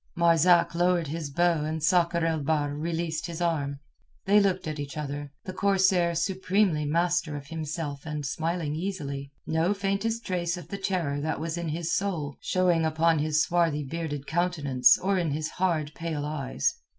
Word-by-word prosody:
Marzak 170 +1 +4
lowered 175 0 +2
his 155 0 -4
bow 170 +1 +2
and 155 0 -3
Sakr 170 -1 +3
el 160 -1 +1
Bahr 145 0 0
released 165 +2 -2
his 170 -1 -6
arm. 150 -5 -1 0.5
They 205 +2 +5
looked 190 -4 +1
at 155 -1 -4
each 145 0 -6
other, 145 -1 -4
the 185 - -6
corsair 190 -3 +2
supremely 185 -2 +1
master 170 0 +1
of 140 - -8
himself 155 -2 -5
and 150 -2 -4
smiling 160 +1 -2
easily, 145 -6 -4
no 165 +5 +1
faintest 200 +4 -1
trace 175 -2 -1
of 170 -2 -10
the 200 - -5
terror 170 -7 -1
that 155 -1 -2
was 165 +1 -3
in 170 -2 -3
his 165 +1 -2
soul 165 -8 -1
showing 180 -3 +2
upon 160 0 +2
his 155 +1 +2
swarthy 165 -4 +1
bearded 145 -1 -4
countenance 150 -8 +3
or 195 0 0
in 170 -3 0
his 155 +2 -2
hard 165 -5 0
pale 160 -3 -3
eyes. 140 - -1
165 Hz, 170 wpm, -27 LUFS, 150-175 Hz, 0.5 s, They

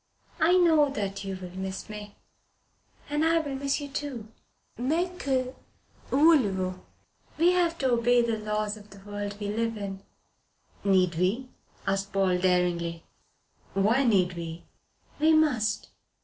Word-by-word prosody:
I 350 +3 +5
know 320 -5 +5
that 200 -8 -3
you 195 -1 -4
will 180 -1 -9
miss 190 0 -5
me. 210 -1 -8 0.9
And 295 +1 0
I 330 +1 +4
will 295 -4 -2
miss 275 +2 -1
you 290 - -5
too. 275 -6 -5 0.5
Mais 325 +8 0
que 260 -2 0 0.6
voulez 285 -6 +5
vous? 185 -1 -1 0.6
We 340 +3 +5
have 345 -2 +1
to 265 -4 +1
obey 240 0 +4
the 230 -2 -1
laws 210 0 -2
of 210 0 -15
the 200 - -13
world 205 0 -5
we 205 -1 -3
live 225 +1 -1
in." 195 -2 -5 0.8
"Need 185 -3 +3
we?" 210 +9 0 0.4
asked 195 0 -1
Paul 190 -2 +2
daringly. 175 -2 +1 0.7
"Why 220 +7 +3
need 190 -7 +3
we?" 170 -1 -6 0.6
"We 315 +2 +5
must. 280 -9 +2
215 Hz, 145 wpm, -27 LUFS, 195-280 Hz, 0.9 s, I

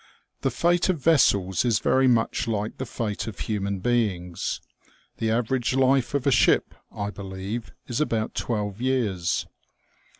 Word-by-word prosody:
The - - +1
fate 175 +1 +2
of 185 - +2
vessels 100 - +3
is 120 -4 +3
very 130 +5 +3
much 115 -2 +1
like 105 -1 -2
the 130 - -3
fate 110 -1 -3
of 110 - -6
human 100 -3 -2
beings. 95 -8 -1 0.6
The 110 - -1
average 120 +2 0
life 135 0 +3
of 140 - 0
a 140 - +4
ship, 115 - +3 0.2
I 105 0 -4
believe, 100 +3 -6
is 120 +3 -2
about 110 -7 -1
twelve 105 -2 -3
years. 110 -10 0
115 Hz, 145 wpm, -25 LUFS, 100-130 Hz, 0.6 s, a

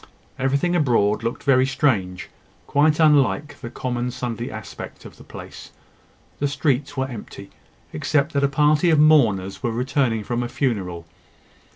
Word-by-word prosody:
Everything 140 +7 +1
abroad 115 -9 +2
looked 115 +1 -4
very 130 -2 +4
strange 100 -11 0 0.4
quite 150 +2 +2
unlike 150 -1 +2
the 120 - -6
common 125 0 -3
Sunday 120 -1 -4
aspect 110 -1 -9
of - - -12
the - - -14
place. - - -11 0.7
The 145 - +1
streets 145 0 -1
were 130 0 0
empty, 105 -5 -10 0.4
except 145 - 0
that 140 -1 +1
a - - +5
party 150 +4 +3
of 160 - +4
mourners 115 -12 +3
were 120 - -1
returning 125 -2 0
from 120 +3 -2
a 120 - -3
funeral. 95 - -2
130 Hz, 150 wpm, -22 LUFS, 115-145 Hz, 0.7 s, a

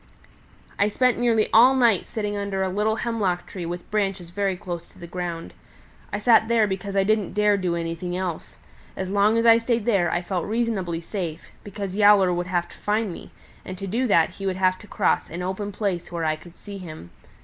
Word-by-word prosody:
"I 200 - +4
spent 250 +3 +2
nearly 230 -3 +2
all 250 +4 +7
night 235 -7 +3
sitting 210 -2 -3
under 200 -1 -2
a 190 - 0
little 210 +3 0
hemlock 215 -7 -1
tree 175 -3 -6
with 175 +1 -6
branches 195 -4 -1
very 195 0 -1
close 175 -2 -6
to - - -22
the 175 - -9
ground. 170 -1 -5 0.6
I - - -1
sat 220 +1 +4
there 230 -2 +3
because 195 0 -4
I 195 - +4
didn't 210 -1 0
dare 210 0 +3
do 180 -3 -1
anything 170 +1 -3
else. 180 -3 -5 0.4
As 190 0 -3
long 205 +3 +3
as 230 - +1
I 230 0 +7
stayed 230 -2 -1
there 195 -7 +2
I 175 +2 -1
felt 180 -1 -2
reasonably 210 -7 -1
safe, 170 -3 -5
because 200 -2 -6
Yowler 205 -3 +6
would 175 0 -2
have 175 -1 -1
to - - -14
find 210 -2 0
me, - - -10 0.3
and 185 - -7
to 195 - -5
do 235 +7 0
that 165 -6 +4
he 195 - -6
would 190 - 0
have 185 0 +2
to 210 - -14
cross - - 0
an 175 +2 -5
open 190 +3 -3
place 195 -4 -3
where 170 -2 -2
I 155 0 +1
could 170 +2 -15
see 200 -1 -9
him. 155 - -10
195 Hz, 215 wpm, -24 LUFS, 175-210 Hz, 0.6 s, all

